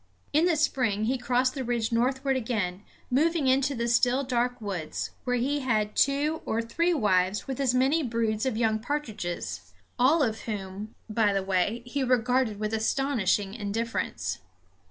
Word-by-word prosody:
In 310 +3 +4
the 345 - +3
spring 250 -9 +1
he 255 +3 0
crossed 250 +1 +1
the 270 - -3
ridge 235 -2 -1
northward 265 +3 +1
again, 215 -7 -2 0.3
moving 315 +3 +2
into 270 +2 +2
the 235 0 -1
still 245 +3 +3
dark 245 -1 0
woods, 190 -8 -4
where 250 -1 +1
he 275 +4 0
had 215 -6 0
two 290 +3 +2
or 225 - -1
three 285 +10 0
wives 195 - +1
with 265 -1 -4
as 255 -3 +2
many 270 +6 +3
broods 230 -3 -1
of 240 -4 -1
young 220 -2 +1
partridges; 220 -9 -4 0.3
all 290 +5 +5
of 220 -4 -1
whom, 205 0 -5
by 215 -2 +2
the 195 -1 0
way, 195 +5 0
he 270 +3 -2
regarded 250 -3 +1
with 215 0 -2
astonishing 220 -4 +1
indifference. 205 - -3
240 Hz, 160 wpm, -27 LUFS, 215-265 Hz, 0.3 s, all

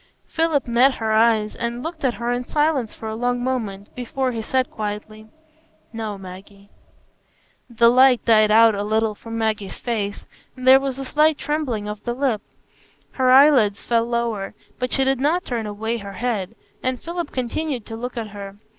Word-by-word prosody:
Philip 320 -5 0
met 250 +3 +4
her 220 -1 -2
eyes 220 -1 +3
and 235 +1 -4
looked 325 -1 -6
at 255 -3 +1
her 235 0 -2
in 245 0 -1
silence 295 -4 0
for 220 - -9
a 220 - -3
long 245 +2 -1
moment, 215 -6 -3
before 255 +1 -2
he 230 -2 -4
said 260 +3 -1
quietly, 215 +1 -6 0.6
"No, 220 -3 -4
Maggie." 195 +2 -12 1.0
The 235 0 +4
light 255 0 +5
died 215 -2 +5
out 225 +1 +6
a 200 - -2
little 215 +1 0
from 230 +2 -8
Maggie's 215 -3 -2
face, 210 -4 -3 0.3
and 255 0 -5
there 265 +1 +9
was 270 -1 -3
a 270 - -5
slight 305 +2 +3
trembling 270 -10 -2
of 210 0 -6
the 240 0 -3
lip. 255 -6 0 0.7
Her 260 -1 +1
eyelids 255 -7 +5
fell 230 -1 +2
lower, 235 -4 -2 0.2
but 250 0 -2
she 270 - +3
did 265 -1 +1
not 325 +7 +1
turn 230 -3 -3
away 220 +3 -3
her 200 -1 -8
head, 225 -2 -3 0.3
and 255 -1 -2
Philip 340 -1 -5
continued 255 0 -3
to 225 - -7
look 245 +2 -6
at 225 -2 -4
her. 200 -1 -9
235 Hz, 180 wpm, -22 LUFS, 215-260 Hz, 1.0 s, there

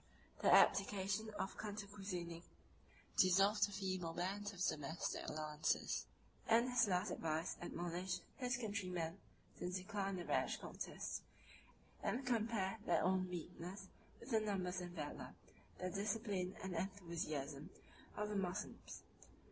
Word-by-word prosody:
The - - +6
abdication 200 +2 +5
of 190 - -2
Cantacuzene 200 -5 -4 0.8
dissolved 195 +3 +6
the - - -9
feeble 185 -4 -1
bands 195 +4 -1
of 195 - -11
domestic 160 -3 0
alliance; 155 0 0 0.4
and 235 +3 +5
his 245 -3 +5
last 180 -2 +2
advice 160 +2 0
admonished 175 +1 -2
his 250 -2 +1
countrymen 185 -6 -2 0.4
to 180 - -1
decline 195 +1 -1
a 175 - -4
rash - - +2
contest, - - -4 0.8
and 255 +2 0
to 250 - +3
compare 220 -2 +1
their - - +3
own 185 0 +3
weakness 180 +2 -5 0.3
with 260 - -9
the 220 - +5
numbers 190 -4 0
and 175 0 -6
valor, 150 -3 -5 0.4
the 185 0 -2
discipline 200 -2 0
and 190 -1 -2
enthusiasm, 165 -6 -2 0.5
of 210 0 0
the 210 - -2
Moslems. 190 0 -3
190 Hz, 125 wpm, -41 LUFS, 175-205 Hz, 0.8 s, The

